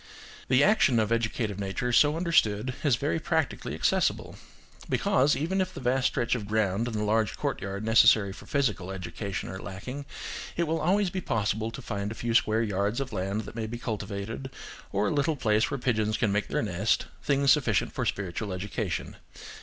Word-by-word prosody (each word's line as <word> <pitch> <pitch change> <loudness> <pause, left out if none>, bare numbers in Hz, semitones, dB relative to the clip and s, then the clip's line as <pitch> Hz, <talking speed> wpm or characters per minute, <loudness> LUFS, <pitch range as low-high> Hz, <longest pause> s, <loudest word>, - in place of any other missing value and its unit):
The 130 +2 +4
action 145 - +4
of 110 0 0
educative 110 -3 -1
nature 100 +5 -2
so 145 +5 +5
understood 130 - +2
is 145 -5 +4
very 145 +7 -1
practically 160 -2 -1
accessible. - - 0 0.5
Because, 140 +3 +3
even 180 +7 0
if 185 0 -3
the - - -5
vast 130 +1 +2
stretch 120 - 0
of 110 -5 -2
ground 110 +1 +1
and 115 - -4
the 105 - -1
large 110 0 +1
courtyard 100 +2 -3
necessary 110 -3 +5
for - - -13
physical 115 -10 0
education 95 +1 -5
are 95 - -6
lacking, 125 +9 -7 0.5
it 170 - +2
will 165 0 0
always 190 +3 +2
be 185 - -3
possible 110 - -1
to 135 +3 -8
find 100 -2 -3
a - - -6
few 115 0 -2
square 110 0 +3
yards 100 +2 0
of 135 -3 -4
land 100 +2 -1
that 110 - -9
may 110 -2 -3
be 120 +2 -5
cultivated, 110 +2 -4 0.4
or 100 +1 +1
a - - 0
little 150 +2 +1
place 110 -5 +2
where 140 - -2
pigeons 110 -4 0
can 110 - +1
make 105 0 0
their - - -1
nest, 105 +1 +1 0.2
things 140 -1 +3
sufficient 125 -9 +2
for - - -2
spiritual 100 +1 -3
education. 95 0 -4
110 Hz, 185 wpm, -28 LUFS, 100-135 Hz, 0.5 s, so